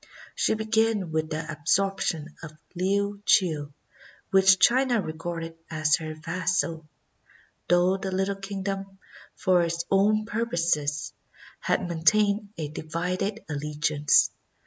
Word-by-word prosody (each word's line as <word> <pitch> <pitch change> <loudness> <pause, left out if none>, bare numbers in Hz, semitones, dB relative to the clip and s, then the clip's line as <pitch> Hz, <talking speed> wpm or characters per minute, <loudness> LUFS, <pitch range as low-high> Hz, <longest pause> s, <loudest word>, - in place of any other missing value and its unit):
She - - +1
began 220 -4 0
with 155 0 -1
the 155 +1 -3
absorption 165 0 0
of 155 -2 -10 0.2
Liuchiu, 190 -5 +1 0.6
which 190 0 +6
China 250 +2 +4
regarded 165 -1 -5
as 155 0 +2
her 155 -1 -6
vassal, 165 0 -2 0.8
though 180 +2 +4
the 190 0 -4
little 195 +1 -1
kingdom, 195 0 -5 0.4
for 185 -1 +3
its 170 0 -2
own 210 +2 +3
purposes, 170 -10 -1 0.5
had - - 0
maintained 200 +5 +2
a 155 -2 -3
divided 180 +7 -3
allegiance. 150 0 +2
180 Hz, 105 wpm, -26 LUFS, 160-200 Hz, 0.8 s, which